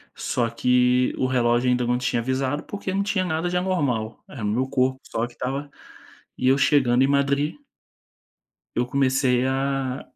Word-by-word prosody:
só 120 -2 -1
que 125 +1 +2
o - - 0
relógio 120 -1 +2
ainda 125 0 +1
não 120 +1 +1
tinha 125 -1 -1
avisado 130 +4 -1
porque 200 -2 -5
não 200 +1 +1
tinha 200 -2 0
nada 165 0 -1
de 180 - 0
anormal, 145 - -1
era 135 - -8
o - - 0
meu 125 +6 0
corpo 130 0 0
só 115 - -2
que 120 - -17
estava 135 +4 -4 0.7
e 130 - 0
eu 135 - +4
chegando 130 -3 +3
em - - +3
Madrid 140 +1 +1 1.2
eu 120 - +1
comecei 130 -1 +1
a 135 -1 -1
130 Hz, 170 wpm, -24 LUFS, 125-140 Hz, 1.2 s, eu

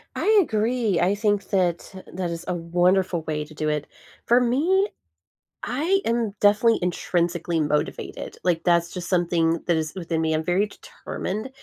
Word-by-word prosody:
I 430 0 +4
agree. 225 - 0
I 190 +3 +2
think 205 -2 0
that 180 -4 0 0.2
that 180 -1 -3
is 170 +1 -6
a - - 0
wonderful 175 0 +1
way 150 -1 -2
to 155 - -15
do 155 0 -3
it. 150 -1 -2 0.4
For 240 +1 +5
me, 325 - +2 0.8
I 330 +10 +1
am 230 -3 0
definitely 210 +3 +4
intrinsically 175 -1 -1
motivated, 150 -1 -2
like, 170 -2 +1
that's 170 -1 +2
just 175 -2 -6
something 170 -2 +1
that 170 - +2
is 155 +1 -3
within 165 -3 -2
me, 160 -1 +1
I'm 155 - -1
very 185 +5 +1
determined. 210 +3 -6
180 Hz, 160 wpm, -24 LUFS, 165-215 Hz, 0.8 s, For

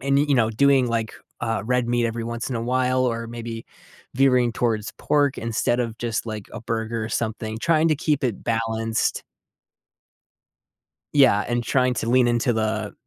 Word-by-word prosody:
and, 140 +1 +1
y 145 - +3
you 140 - +3
know, 115 -2 +3
doing, 135 +2 +3
like, 115 -1 -2 0.3
uh, 115 -3 -1
red 125 0 0
meat, 120 -1 +1
every 115 0 -3
once 115 +1 -4
in 125 - -2
a 115 - -3
while, 130 +1 +1
or 115 -1 -1
maybe 115 -1 -7 0.5
veering 125 -3 +3
towards 110 -3 -1
pork 145 -2 +1
instead 115 +2 0
of 115 -1 -3
just, 115 -1 -2
like, 110 -2 -5
a - - -6
burger 115 0 -3
or - - -5
something 110 -1 -3
trying 165 +3 +2
to 155 - +2
keep 150 -2 0
it 115 -6 -2
balanced 115 0 -1 1.9
Yeah, 125 -7 +5
and 120 0 -1
trying 125 0 +1
to 115 - -3
lean 125 -1 +4
into 120 +1 +1
the 110 -1 -1
120 Hz, 180 wpm, -23 LUFS, 115-125 Hz, 1.9 s, Yeah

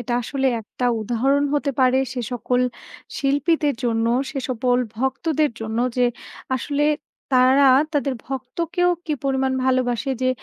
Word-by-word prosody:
এটা 240 0 -4
আসলে 270 +3 -1
একটা 235 +3 -6 0.2
উদাহরণ 255 +6 +1
হতে 285 -1 0
পারে 255 0 +4
সে 250 - -3
সকল 245 +1 0 0.6
শিল্পীদের 285 +1 +1
জন্য, 225 -1 +1 0.2
সে 285 - -4
সকল 250 0 +1 0.2
ভক্তদের 295 +4 0
জন্য, 220 +1 -3 0.2
যে 250 - +3 0.5
আসলে 290 +3 -1 0.5
তারা 260 +2 +5 0.3
তাদের 280 -2 0
ভক্তকেও 335 +8 -1
কী 310 - -2
পরিমাণ 265 -1 +1
ভালোবাসে 255 0 +1
যে 255 - +3
265 Hz, 130 wpm, -22 LUFS, 245-285 Hz, 0.6 s, তারা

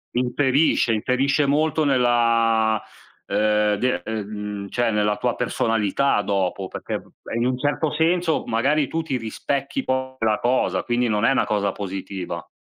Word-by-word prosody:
Inferisce, 130 0 +2
inferisce 135 +6 +1
molto 155 +2 +1
nella, 115 -4 +2 0.5
uhm, 105 0 +2
de 125 +4 0
ehm, 110 -2 -4
mhmm, 105 -1 -5
cioè, 120 -1 0
nella 105 0 +1
tua - - -1
personalità 115 +2 +1
dopo, 95 -1 -1
perché - - -5
p - - -21 0.2
è - - -4
in 120 +1 0
un 125 0 0
certo 145 +3 0
senso, 165 +1 +1
magari 140 +5 +1
tu 165 - -2
ti 135 -5 -2
rispecchi 140 - -3
poi 130 0 -2
quella 110 -2 +1
cosa, 125 +2 +1
quindi 120 0 0
non 105 +1 +1
è - - +4
una - - +2
cosa 100 -2 0
positiva. 95 -3 -5
120 Hz, 155 wpm, -23 LUFS, 105-135 Hz, 0.5 s, è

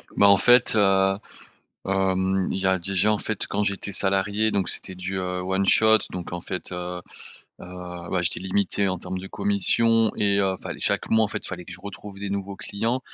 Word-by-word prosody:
Ben, 100 - +5
en 100 -1 +7
fait, 120 +2 +5
heu, 95 -1 +3 0.7
hem, 95 0 0
il - - -2
y 95 - -2
a 95 -1 +2
déjà 100 +3 +1
en 105 - +2
fait 110 -3 -2
quand 105 - -1
j'étais 100 0 -2
salarié 100 +3 +1
donc 95 -2 0
c'était 95 - -4
du, 95 +1 -4
heu, 90 0 -3
one 95 +1 0
shot 110 0 +5
donc 90 -1 -6
en 90 - -4
fait, 90 0 -5
heu, 90 0 -4 0.6
heu, 90 -1 -8
bah, 90 - +1
j'étais 85 - -1
limité 95 +1 0
en 95 -1 -2
termes 90 +1 -5
de 95 - -8
commission 110 +3 +2
et 100 -1 +2
heu, 95 -1 +1
fallait - - -6
chaque - - 0
mois 110 0 +4
en - - -2
fait - - -5
il - - -2
fallait 90 -2 -7
que 90 - -10
je 90 - -10
retrouve 100 0 -9
des 100 -1 -5
nouveaux 100 0 -4
clients. 115 +5 -2
95 Hz, 215 wpm, -24 LUFS, 90-100 Hz, 0.7 s, en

